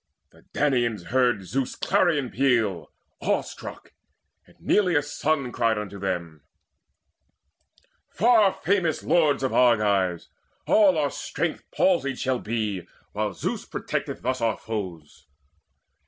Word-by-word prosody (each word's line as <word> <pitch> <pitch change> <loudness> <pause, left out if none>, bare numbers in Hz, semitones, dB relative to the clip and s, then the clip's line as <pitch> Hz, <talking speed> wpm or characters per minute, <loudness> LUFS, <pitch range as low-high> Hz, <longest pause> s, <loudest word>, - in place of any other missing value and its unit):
The - - -21
Danaans 120 -10 0
heard 120 -5 +2
Zeus' 130 +8 -2
clarion 170 -9 +1
peal 115 - +1 0.3
Awe - - +1
struck; - - -10 0.5
and - - -22
Neleus' 160 -8 +1
son 140 -5 0
cried 115 -3 +1
unto 100 -1 -6
them: 85 -5 -4 1.7
"Far 220 -3 +4
famous 180 -6 0
lords 150 -5 +2
of 130 - 0
Argives, 100 -8 +2 0.4
all 195 -5 +5
our 145 -3 +1
strength - - -4
Palsied 140 -9 +1
shall 130 -1 -1
be, 105 -5 -3 0.2
while 105 -2 -2
Zeus - - -3
protecteth - - -4
thus 130 +1 -1
Our 115 -2 +1
foes. 85 -9 -7
120 Hz, 115 wpm, -25 LUFS, 100-145 Hz, 1.7 s, all